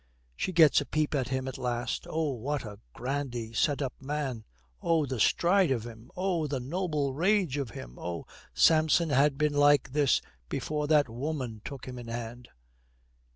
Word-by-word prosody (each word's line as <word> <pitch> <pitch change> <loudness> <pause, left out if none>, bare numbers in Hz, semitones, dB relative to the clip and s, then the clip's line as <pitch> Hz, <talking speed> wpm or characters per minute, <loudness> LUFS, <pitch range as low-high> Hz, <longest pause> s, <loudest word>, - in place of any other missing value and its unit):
She 185 - -2
gets 160 -4 +6
a - - -4
peep 155 -1 0
at 135 -4 0
him 130 0 -2
at 130 - -5
last. 120 -1 -2
Oh, 160 -2 0
what 135 +3 -3
a 105 -1 -9
grandly 125 - -4
set 145 +5 +1
up 130 - -3
man! 135 -5 -3 0.4
Oh, 165 -3 +2
the 130 -3 -4
stride 180 - +4
of 120 -4 0
him. 115 +1 -11
Oh, 180 -4 0
the 140 -2 -2
noble 150 0 -1
rage 180 -1 +2
of 140 -4 -2
him. - - -10
Oh, 85 -1 -5 0.3
Samson 160 0 +4
had 140 +1 +3
been 150 0 +1
like 145 -1 +4
this 145 -1 +3 0.3
before 150 -1 -2
that 150 -2 +4
woman 125 -2 -4
took 140 -3 -8
him 125 -1 -6
in 120 - -9
hand. 120 +1 -6
140 Hz, 175 wpm, -29 LUFS, 125-155 Hz, 0.4 s, gets